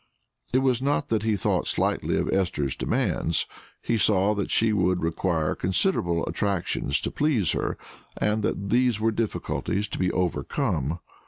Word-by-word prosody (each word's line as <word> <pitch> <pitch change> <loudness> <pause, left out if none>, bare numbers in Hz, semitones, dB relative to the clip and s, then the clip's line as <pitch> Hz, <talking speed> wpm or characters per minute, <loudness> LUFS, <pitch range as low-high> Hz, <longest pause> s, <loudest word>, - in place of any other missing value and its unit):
It 130 +1 +2
was 130 -2 +2
not 145 +1 0
that 110 -2 +1
he 110 -1 +1
thought 95 - 0
slightly - - 0
of - - 0
Esther's 85 -8 0
demands; 85 - 0 0.4
he 115 - 0
saw 100 0 +3
that 100 -2 -2
she 110 -1 +2
would 90 -3 +1
require 80 -1 0
considerable 90 - +1
attractions 95 -8 -1
to - - -2
please 135 - +1
her, - - -2 0.4
and 105 +1 +1
that 100 -1 -2
there 125 +1 +4
were 115 +1 +2
difficulties 105 -1 -2
to - - -5
be 90 -1 +1
overcome. 80 -3 -1
100 Hz, 155 wpm, -26 LUFS, 90-115 Hz, 0.4 s, there